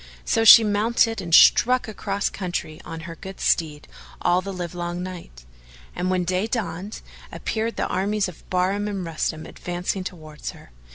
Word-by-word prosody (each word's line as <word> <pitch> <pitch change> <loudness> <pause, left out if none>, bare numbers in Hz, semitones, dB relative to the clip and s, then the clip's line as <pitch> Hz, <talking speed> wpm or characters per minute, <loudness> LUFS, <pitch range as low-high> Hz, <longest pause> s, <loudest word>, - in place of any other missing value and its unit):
So 225 - +2
she 225 +1 +10
mounted 225 +2 +1
and 170 - -7
struck 250 +9 +6
across 200 -1 -2
country 175 -4 -5
on 165 0 -7
her 165 +1 -7
good 190 +3 -10
steed 150 -3 0 0.3
all 175 +1 +2
the 195 +1 -6
livelong 175 -1 -4
night; 170 - -9 0.5
and, 180 +1 -1
when 185 -1 +1
day 185 +4 0
dawned, 205 -3 -4 0.3
appeared 225 +1 -3
the - - -1
armies 200 +2 0
of 180 - -12
Bahram 190 +3 0
and 195 -3 -4
Rustam 160 -1 -3
advancing 180 +3 -4
towards 155 -4 -8
her. - - -16
185 Hz, 160 wpm, -23 LUFS, 170-205 Hz, 0.5 s, she